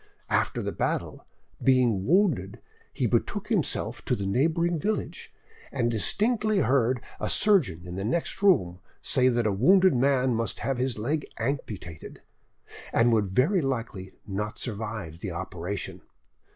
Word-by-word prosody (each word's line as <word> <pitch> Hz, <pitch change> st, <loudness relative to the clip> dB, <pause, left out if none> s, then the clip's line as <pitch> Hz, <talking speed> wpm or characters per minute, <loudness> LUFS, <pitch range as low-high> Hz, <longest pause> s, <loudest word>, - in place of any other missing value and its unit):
After -, -, +1 dB
the -, -, -2 dB
battle, -, -, -3 dB, 0.4 s
being 125 Hz, -7 st, +3 dB
wounded, 140 Hz, -, +2 dB, 0.3 s
he -, -, -2 dB
betook -, -, -1 dB
himself -, -, -1 dB
to -, -, +1 dB
the 100 Hz, -, -4 dB
neighbouring 165 Hz, -, +1 dB
village, 215 Hz, +7 st, -3 dB, 0.4 s
and 120 Hz, 0 st, 0 dB
distinctly 215 Hz, -, +1 dB
heard 130 Hz, -1 st, +2 dB, 0.2 s
a -, -, -2 dB
surgeon 130 Hz, -, +2 dB
in 90 Hz, +1 st, -7 dB
the 95 Hz, -, -3 dB
next 165 Hz, -, -2 dB
room 90 Hz, -, +3 dB, 0.2 s
say 130 Hz, 0 st, +3 dB
that 120 Hz, -2 st, +1 dB
a 105 Hz, -, +2 dB
wounded 185 Hz, -, +5 dB
man 130 Hz, 0 st, +2 dB
must 115 Hz, 0 st, -2 dB
have 135 Hz, -2 st, -1 dB
his 130 Hz, -2 st, -1 dB
leg 145 Hz, +8 st, -2 dB
amputated, 110 Hz, -, -5 dB, 0.7 s
and 115 Hz, 0 st, +3 dB
would 105 Hz, -3 st, +2 dB
very 145 Hz, -, +2 dB
likely 115 Hz, -8 st, -4 dB
not 105 Hz, +2 st, -4 dB
survive 105 Hz, -7 st, -5 dB
the 100 Hz, -, -5 dB
operation. 90 Hz, +2 st, -5 dB
120 Hz, 140 wpm, -27 LUFS, 100-145 Hz, 0.7 s, wounded